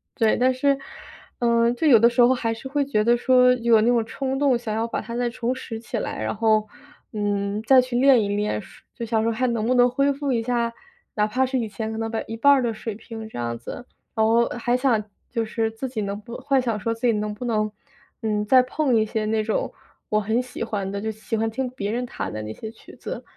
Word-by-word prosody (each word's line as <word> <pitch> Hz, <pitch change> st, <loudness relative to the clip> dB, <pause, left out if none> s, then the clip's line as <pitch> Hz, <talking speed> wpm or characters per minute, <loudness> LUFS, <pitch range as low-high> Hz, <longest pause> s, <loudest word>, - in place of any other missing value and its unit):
对， 225 Hz, -3 st, +2 dB
但 255 Hz, +1 st, +3 dB
是， 275 Hz, +2 st, +2 dB, 0.6 s
嗯， 235 Hz, 0 st, +3 dB
就 280 Hz, -, -2 dB
有 240 Hz, -6 st, +7 dB
的 235 Hz, +2 st, +6 dB
时 245 Hz, +1 st, +2 dB
候 245 Hz, +2 st, +6 dB
还 230 Hz, -3 st, -1 dB
是 230 Hz, +4 st, -8 dB
会 285 Hz, +1 st, 0 dB
觉 215 Hz, -6 st, +1 dB
得 240 Hz, +1 st, +4 dB
说， 250 Hz, 0 st, +5 dB
有 235 Hz, -3 st, +3 dB
那 225 Hz, -, +2 dB
种 235 Hz, -2 st, +3 dB
冲 270 Hz, +3 st, -3 dB
动 275 Hz, -4 st, +3 dB
想 235 Hz, -3 st, -4 dB
要 225 Hz, +1 st, -1 dB
把 -, -, -3 dB
它 230 Hz, +2 st, -8 dB
再 245 Hz, 0 st, 0 dB
重 240 Hz, +1 st, -2 dB
拾 240 Hz, -3 st, -6 dB
起 235 Hz, +1 st, -5 dB
来， -, -, -4 dB
然 -, -, -1 dB
后， 215 Hz, 0 st, +2 dB, 0.5 s
嗯， 205 Hz, -1 st, -1 dB
再 255 Hz, +2 st, +6 dB
去 250 Hz, -1 st, -3 dB
练 255 Hz, -3 st, +5 dB
一 200 Hz, -, -2 dB
练， 210 Hz, +1 st, -1 dB
说 -, -, -16 dB
就 235 Hz, -, -5 dB
想 225 Hz, -1 st, +1 dB
说， 230 Hz, -, +1 dB
还 250 Hz, +3 st, -1 dB
能 230 Hz, -2 st, -1 dB
不 255 Hz, -, +3 dB
能 245 Hz, 0 st, +5 dB
恢 275 Hz, +3 st, +1 dB
复 280 Hz, -1 st, -2 dB
一 235 Hz, -, +1 dB
下 235 Hz, -1 st, 0 dB, 0.4 s
哪 210 Hz, 0 st, +2 dB
怕 255 Hz, +4 st, +1 dB
是 260 Hz, 0 st, -1 dB
以 225 Hz, -, -2 dB
前 220 Hz, +1 st, -5 dB
可 220 Hz, -, -5 dB
能 225 Hz, 0 st, -2 dB, 0.2 s
一 225 Hz, -, -5 dB
半 280 Hz, +5 st, +6 dB
儿 265 Hz, -3 st, +2 dB
的 230 Hz, -2 st, 0 dB
水 215 Hz, -1 st, -6 dB
平， 225 Hz, 0 st, -9 dB
这 -, -, -9 dB
样 115 Hz, -1 st, -3 dB
子。 240 Hz, -, -8 dB, 0.3 s
然 220 Hz, -1 st, +3 dB
后 230 Hz, +1 st, +3 dB
还 240 Hz, +1 st, +1 dB
想 250 Hz, -5 st, +2 dB, 0.3 s
就 230 Hz, -2 st, -1 dB
是 225 Hz, 0 st, -1 dB
自 225 Hz, +4 st, -5 dB
己 245 Hz, -3 st, -5 dB
能 200 Hz, 0 st, -3 dB
不 235 Hz, +3 st, -8 dB
幻 270 Hz, 0 st, +1 dB
想 230 Hz, -4 st, -2 dB
说 230 Hz, +4 st, -1 dB
自 230 Hz, +2 st, -1 dB
己 -, -, +5 dB
能 210 Hz, 0 st, -2 dB
不 210 Hz, -, -8 dB
能， 215 Hz, -2 st, 0 dB, 0.5 s
嗯， 210 Hz, -2 st, -1 dB
再 255 Hz, +4 st, +6 dB
碰 255 Hz, -1 st, 0 dB
一 220 Hz, -, +4 dB
些 215 Hz, 0 st, -2 dB
那 215 Hz, 0 st, 0 dB
种 215 Hz, 0 st, -2 dB, 0.4 s
我 215 Hz, -, +2 dB
很 220 Hz, +3 st, 0 dB
喜 250 Hz, -2 st, -6 dB
欢 205 Hz, -4 st, -3 dB
的， 200 Hz, 0 st, -4 dB
就 220 Hz, -, -2 dB
喜 220 Hz, +1 st, -5 dB
欢 225 Hz, +1 st, 0 dB
听 255 Hz, +4 st, -2 dB
别 210 Hz, -5 st, -4 dB
人 245 Hz, +2 st, -2 dB
弹 -, -, -5 dB
的 110 Hz, -, -4 dB
那 105 Hz, 0 st, -6 dB
些 220 Hz, -, -7 dB
曲 225 Hz, -, -16 dB
子。 -, -, -7 dB
230 Hz, 275 characters per minute, -23 LUFS, 215-250 Hz, 0.6 s, 有